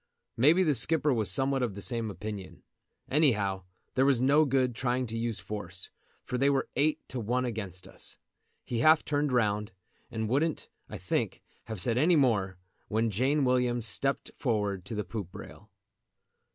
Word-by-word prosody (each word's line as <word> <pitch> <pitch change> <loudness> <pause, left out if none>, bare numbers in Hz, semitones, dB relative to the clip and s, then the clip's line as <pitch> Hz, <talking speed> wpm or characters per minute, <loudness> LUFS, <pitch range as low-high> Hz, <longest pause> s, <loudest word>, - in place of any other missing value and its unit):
Maybe 155 +10 +5
the 155 -4 +3
skipper 145 +3 +3
was 110 -6 0
somewhat 135 +6 +2
of 115 -6 -1
the 100 - -7
same 115 -3 -1
opinion. 105 -1 -7 0.4
Anyhow 105 - +2 0.3
there 130 - +3
was 135 -3 +3
no 140 +5 +4
good 130 -2 +1
trying 125 +1 -1
to 115 -1 -6
use 115 -2 -2
force, 95 -2 -6 0.3
for 125 - -3
they 140 +2 +4
were 140 -1 0
eight 150 +3 +1
to 130 - -4
one 125 +3 0
against 100 -6 -5
us. - - -8 0.5
He 120 - -2
half 155 +5 +5
turned 145 -1 0
round, 105 -4 0 0.4
and 110 0 -3
wouldn't, 145 +7 0 0.2
I - - -6
think, - - -2 0.2
have 110 -3 -6
said 115 +6 +2
any 170 +5 +4
more, 105 - +2 0.3
when 110 +1 0
Jane 135 +7 +1
Williams 125 -2 +1
stepped 135 +5 0
forward 105 -7 -1
to 115 - -5
the 105 - -1
poop 105 -6 -6
rail. - - -11
120 Hz, 170 wpm, -29 LUFS, 105-135 Hz, 0.5 s, Maybe